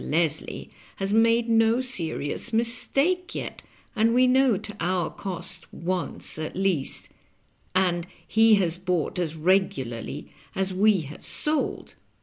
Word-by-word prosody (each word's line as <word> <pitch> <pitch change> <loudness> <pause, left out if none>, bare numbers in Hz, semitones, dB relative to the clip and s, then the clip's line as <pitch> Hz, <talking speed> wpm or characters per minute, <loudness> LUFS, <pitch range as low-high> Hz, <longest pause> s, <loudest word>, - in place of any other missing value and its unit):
Leslie 160 0 -1 0.2
has 195 +1 -2
made 230 +1 +4
no 225 +1 +4
serious 180 - -3
mistake 275 +10 0
yet, - - -5 0.3
as 220 0 +4
we 245 +2 +4
know 255 -3 +4
to 210 +2 -6
our 175 -1 0
cost 190 -3 -4
once 180 -2 -3
at 155 - -4
least, 185 -7 -1 0.7
and 175 -2 +1 0.2
he 220 0 +5
has 180 -3 0
bought 180 -2 -1
as 165 -3 -1
regularly 155 - -1 0.2
as 190 0 0
we 200 0 +4
have 150 0 -10
sold. 300 -1 -2
190 Hz, 130 wpm, -26 LUFS, 170-230 Hz, 0.7 s, he